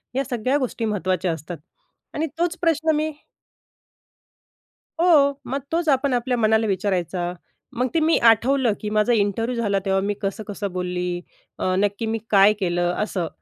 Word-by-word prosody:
या 270 - +1
सगळ्या 250 +3 0
गोष्टी 250 -4 -2
महत्त्वाच्या 185 -4 -1
असतात. 160 +2 -7 0.6
आणि 315 +2 -1
तोच 345 0 0
प्रश्न 320 -2 +2
मी 310 +1 0 1.9
हो. 285 -5 +4
मग 270 +3 -2
तोच 330 0 0
आपण 275 -1 +2
आपल्या 245 0 0
मनाला 220 0 +2
विचारायचा. 185 -2 -1 0.4
मग 250 +2 +1
ते 330 - +3
मी 320 +1 +3
आठवलं 240 +1 +4
की 210 - -3
"माझा 215 +3 +2
इंटरव्ह्यू 225 +3 0
झाला 200 -3 +1
तेव्हा 195 0 +2
मी 205 +1 -1
कसं-कसं 200 0 -4
बोलली, 180 -1 -3 0.4
अ, 185 0 0
नक्की 205 +2 0
मी 225 +1 -1
काय 200 0 +6
केलं?" 175 -2 0
असं. 185 -5 -2
215 Hz, 150 wpm, -23 LUFS, 190-265 Hz, 1.9 s, काय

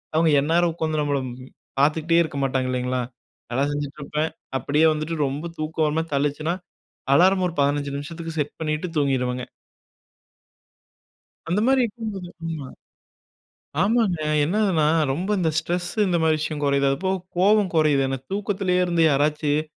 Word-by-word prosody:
அவங்க 165 0 +4
எந்நேரம் 165 +3 +2
உட்காந்து 155 -2 -2
நம்மள 145 -1 0 0.6
பார்த்துகிட்டே 160 +3 +3
இருக்க 150 -3 -6
மாட்டாங்க. 130 -1 0
இல்லைங்களா, 125 0 -1 0.5
நல்லா 135 +3 +1
செஞ்சுட்டு 145 0 -4
இருப்பேன். 150 +2 -1 0.3
அப்படியே 150 +6 +2
வந்துட்டு 155 +2 -3
ரொம்ப 145 +5 -4
தூக்கம் 155 0 -1
ஒருமாரி 160 +2 -1
தள்ளிச்சுனா, 145 +4 0 0.6
அலார்ம் 185 +4 +5
ஒரு - - -8
15 145 0 0
நிமிஷத்துக்கு 165 +2 -7
செட் 145 0 -3
பண்ணிட்டு 155 +3 -1
தூங்கிருவேங்க. 125 -3 0 2.0
அந்த 190 +5 +1
மாதிரி 265 -1 +4
இருக்கும் 225 -1 -4
போது 180 -2 -7 0.2
ஆமா, 155 -5 -4 1.2
ஆமாங்க 205 -5 +2 0.2
என்னதுன்னா, 180 -2 +2 0.3
ரொம்ப 180 +8 -3
இந்த 165 -2 +2
ஸ்ட்ரெஸ்ஸு, 175 +5 -2
இந்த 175 -1 +2
மாதிரி 160 -1 +3
விஷயம் 150 -1 -3
கொறையுது. 140 0 +2
அது 135 - +1
அப்ப 190 +1 -2 0.3
கோவம் 200 +1 +4
கொறையுது. 150 -3 +4
என்ன 135 0 -2
தூக்கத்திலேயே 195 -2 0
இருந்து 170 -1 +1
யாராச்சும் 150 +1 +1
155 Hz, 140 wpm, -23 LUFS, 145-175 Hz, 2.0 s, அலார்ம்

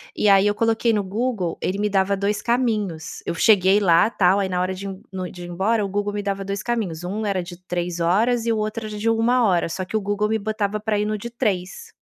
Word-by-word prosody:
E - - +1
aí 195 +1 +6
eu 205 - +1
coloquei 225 +1 +2
no 210 -2 +1
Google, 200 -3 -2
ele 185 - -1
me 210 - +1
dava 195 0 +1
2 200 +2 -1
caminhos. 215 -10 -1
Eu - - -1
cheguei 195 +1 +5
lá 180 +1 +4
tal, 190 -3 +3
aí 195 -1 -1
na 180 -1 -1
hora 185 +1 -1
de 195 +1 -6
um 190 0 -8
no 185 -1 -4
de 175 - -10
ir 175 - -8
embora, 205 +4 0
o - - -4
Google 205 +1 -2
me 205 0 -3
dava 195 0 -2
2 200 0 -3
caminhos. 205 -9 -2
Um 205 +5 -3
era 190 -3 0
de 175 0 -10
3 175 -1 -3
horas 225 +8 +2
e - - +3
o 220 - -1
outro 215 +1 -3
era 210 -1 -6
de 220 +2 -3
1 235 +2 +3
hora. 175 -4 +2
Só 185 +2 -4
que 220 - -6
o - - -2
Google 205 +1 -1
me 220 0 +1
botava 215 0 -2
pra 210 0 -1
ir 210 - 0
no 215 0 -1
de 235 +3 -7
3 200 -7 -3
205 Hz, 265 wpm, -22 LUFS, 185-220 Hz, -, aí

